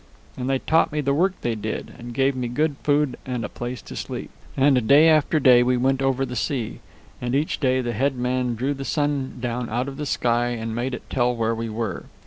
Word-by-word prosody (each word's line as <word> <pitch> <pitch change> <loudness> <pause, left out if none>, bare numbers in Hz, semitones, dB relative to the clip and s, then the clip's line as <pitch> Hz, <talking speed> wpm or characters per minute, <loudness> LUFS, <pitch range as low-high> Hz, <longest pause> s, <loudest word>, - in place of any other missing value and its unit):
And 130 0 -3
they 135 - +2
taught 160 +5 +2
me 150 - -2
the 140 -1 +1
work 185 +6 +2
they 120 - 0
did, 110 0 -5
and 120 0 -8
gave 135 +2 +1
me 125 -1 -2
good 145 +5 0
food 145 -3 +1
and 125 -3 -3
a - - -5
place 120 -1 -6
to - - -9
sleep. - - -5 0.3
"And 135 -4 +3
day 150 +5 +7
after 155 0 +4
day 125 -3 +6
we 125 0 +2
went 135 +2 +1
over 135 0 +1
the 125 -1 -6
sea, 120 -1 -2 0.4
and 125 +1 -1
each 150 +3 0
day 130 -2 +2
the 120 -1 -2
head 135 +4 +1
man 125 -1 -1
drew 130 +5 -1
the 135 -1 -6
sun 145 -2 -1
down 120 -1 -3
out 120 +4 -1
of 135 -1 -6
the 150 -1 -3
sky 120 -1 +1
and 115 -2 -3
made 125 +2 -2
it - - -11
tell 125 -1 +1
where 115 0 0
we 115 0 -3
were. 110 -4 -4
125 Hz, 235 wpm, -23 LUFS, 120-140 Hz, 0.4 s, day